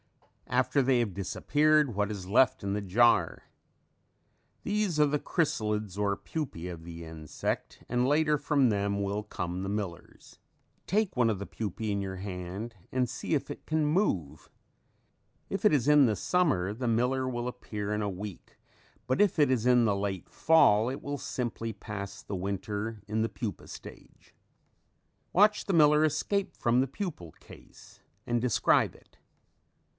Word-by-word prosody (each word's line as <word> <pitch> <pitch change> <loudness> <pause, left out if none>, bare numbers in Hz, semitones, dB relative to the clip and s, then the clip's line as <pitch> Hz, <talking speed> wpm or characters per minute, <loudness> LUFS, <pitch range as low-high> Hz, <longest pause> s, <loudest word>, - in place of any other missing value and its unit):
After 140 - +2
they 130 -1 +3
have 110 -5 -1
disappeared, 145 +7 +2
what 105 +1 0
is 100 -3 -6
left 120 +5 +3
in 100 0 -2
the 105 - -1
jar? 115 +5 +3 1.2
These 205 -6 0
are 150 - +6
the 150 0 0
chrysalids 105 - -1
or 100 -1 0
pupae 130 - -5
of 85 -2 -8
the 85 0 -8
insect 80 -1 -5
and 125 +1 +1
later 150 +1 +3
from 140 -2 +2
them 100 -1 0
will 100 +1 -2
come 90 -2 -4
the 95 - -3
millers. 100 -5 -6 0.5
Take 210 -1 +1
one 120 -2 +3
of 110 - 0
the 100 - -5
pupae 110 +1 -4
in 100 0 -1
your 95 -1 -5
hand 95 +4 -6 0.2
and 130 -1 +1
see 125 +6 -4
if 140 0 -2
it 145 - -8
can 155 -1 +1
move. 150 - 0 1.0
If - - -3
it - - +7
is 140 -4 +2
in 150 -2 +7
the 105 -3 0
summer 120 - +1
the 125 +3 -3
miller 125 +3 +1
will 120 -1 -3
appear 105 -4 -4
in 105 - -1
a 105 - -1
week, 100 0 -8 0.5
but 130 +9 +2
if 205 -4 +3
it 145 -3 +4
is 120 -3 +1
in 125 -1 +5
the 105 -2 +2
late 100 -2 -3
fall 120 -9 +4
it 135 - -5
will 145 0 -4
simply 115 -3 -3
pass 100 -1 -7
the 100 - -5
winter 100 +3 -4
in 110 +1 -1
the 115 - 0
pupa 110 -5 -6
stage. - - -13 1.0
Watch 210 +3 +4
the 195 - -1
miller 150 -2 +5
escape 170 +6 0
from 120 +2 +2
the 135 - 0
pupal 140 - -6
case - - -16 0.2
and 120 -1 0
describe 125 -2 +2
it. - - -22
115 Hz, 165 wpm, -29 LUFS, 100-145 Hz, 1.2 s, it